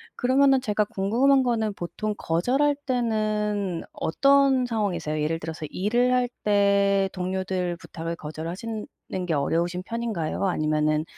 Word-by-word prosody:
그러면은 265 +1 +3
제가 210 -3 0
궁금한 250 +9 +2
거는 220 -4 0
보통 210 +4 -4
거절할 260 - +1
때는 215 -6 -1
어떤 275 +5 +3
상황이세요? 180 -10 -2
예를 165 +2 -1
들어서 160 0 -5
일을 240 +6 +1
할 250 -1 +2 0.2
때 200 -1 +3
동료들 185 -1 -2
부탁을 165 -1 -6
거절하시는 170 +9 -6 0.4
게 165 - 0
어려우신 170 +5 0
편인가요? 220 -7 -2
아니면은 155 -2 +1
200 Hz, 310 characters per minute, -25 LUFS, 170-235 Hz, 0.4 s, 그러면은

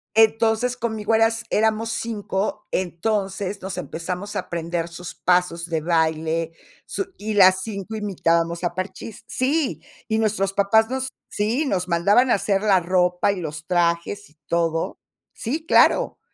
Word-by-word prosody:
Entonces, 225 +2 +3
conmigo 220 -2 -1
eras 225 +1 +2
éramos 220 +1 +1
5, 210 -2 -3
entonces, 195 +2 -2
nos 190 -1 -4
empezamos 180 +4 -5
a - - 0
aprender 170 0 -3
sus 175 +1 -8
pasos 180 -2 +1
de 165 -2 -2
baile, 160 0 0 0.3
su 390 - -3
y 215 +1 -3
las 190 -2 +6
5 210 0 -5
imitábamos 170 -4 0
a 175 0 -1
Parchís. 190 +3 -6
Sí, 275 +2 0 0.3
y 220 -1 +1
nuestros 200 -3 0
papás 220 +3 +3
nos 265 0 -2 0.2
Sí, 230 +9 0
nos 185 -8 -1
mandaban 200 +9 +3
a - - +5
hacer 200 0 0
la 200 -3 +4
ropa, 180 +2 +2
y 195 - -4
los 150 -1 -6
trajes, 175 +3 0
y 150 - -27
todo. 165 +1 -1 0.3
Sí, 300 +8 -4
claro, - - +4
195 Hz, 145 wpm, -23 LUFS, 170-220 Hz, 0.3 s, las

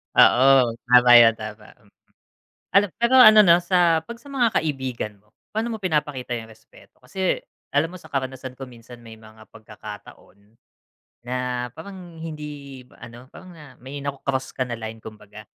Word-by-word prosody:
Oo 130 -1 +5 0.2
tama 125 0 +6
yan 115 -1 +5
tama, 105 -1 -10
mm, 100 -1 -28 0.8
alam 200 +1 +5
pero 235 +2 +2
ano 215 -3 +9
na 170 -2 +5
sa 175 -2 +2
pag 235 - -9
sa 285 +2 -14
mga 250 -4 +2
kaibigan 130 -8 -5
mo 105 +1 -34 0.2
paano 225 +2 -3
mo - - -10
pinapakita 150 -9 -2
yung 110 - -11
respeto? 110 0 -21
Kasi 185 +8 -1 0.4
alam 155 +4 +1
mo 185 - -9
sa - - -15
karanasan 130 -1 -5
ko 135 - -9
minsan 120 0 -14
may 115 -1 -12
mga 110 0 -16
pagkakataon 105 -1 -14 0.7
na 125 0 -3
parang 175 -1 -11
hindi 150 -4 -9 0.2
ano 120 +2 -13
parang 185 -1 -14
na 150 -5 -15
may 140 +2 -8
na 140 - -2
cross 130 -1 -3
ka 130 - -2
na 120 - -5
line 110 0 -8
kumbaga, 105 -1 -13
130 Hz, 165 wpm, -22 LUFS, 115-165 Hz, 0.8 s, ano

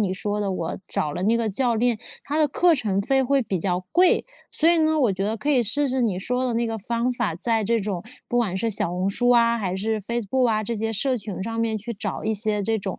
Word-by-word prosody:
你 195 -3 0
说 205 +2 -2
的， 200 -2 -1
我 170 -3 -4
找 150 -1 -2
了 180 - -4
那 230 +2 +3
个 230 -2 -1
教 240 +3 +1
练， 235 0 +1 0.3
他 295 +2 -2
的 310 - +4
课 345 +5 +3
程 205 -7 -1
费 265 +6 +1
会 275 +1 +1
比 190 -5 -3
较 180 +1 -1
贵。 365 +1 +4 0.3
所 325 +2 +3
以 345 - +3
呢， 315 0 +2
我 235 -8 +2
觉 195 +1 -3
得 220 +2 -1
可 285 +7 -2
以 255 -4 +3
试 280 +7 +3
试 260 0 -1
你 200 -6 0
说 250 +5 -1
的 240 - -2
那 235 0 0
个 225 - -3
方 235 +4 -1
法， 235 -9 -2
在 225 +5 0
这 230 +3 +1
种 195 -4 -3 0.3
不 245 - 0
管 200 -6 0
是 230 +4 -1
小 195 - +5
红 180 +2 -1
书 245 +4 +2
啊， 235 -1 +4
还 185 -3 -2
是 215 +2 -2
Facebook 235 +3 -1
啊， 215 -1 +1
这 230 +3 -3
些 225 +1 -2
社 255 +4 +2
群 200 -3 -6
上 225 +2 -3
面 225 -1 0
去 235 +3 -6
找 210 0 -5
一 220 - 0
些 210 0 +2
这 220 +2 0
种 190 -1 -5
225 Hz, 320 characters per minute, -23 LUFS, 200-245 Hz, 0.3 s, 小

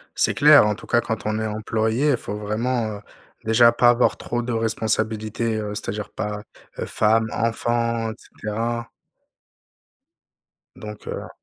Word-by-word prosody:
C'est - - +2
clair 150 -5 +7
en 105 - +1
tout - - -12
cas 120 - +3
quand 110 -2 -4
on 110 0 0
est 110 - -2
employé, 110 +5 0
faut 105 - -6
vraiment, 110 +1 -2
heu, - - -13 0.4
déjà 115 +2 +5
pas 120 +1 +4
avoir 120 0 +2
trop 120 0 -3
de 120 +1 -3
responsabilités, 110 0 -1
heu, 105 -1 -4
c'est-à-dire 105 0 -5
pas, 105 -1 -4 0.4
heu, - - -3
femme, 110 +1 +2
enfants 115 0 0
et - - -6
cetera. 115 +2 -4 1.9
Donc 105 -1 -9
heu - - -5
110 Hz, 145 wpm, -23 LUFS, 105-120 Hz, 1.9 s, clair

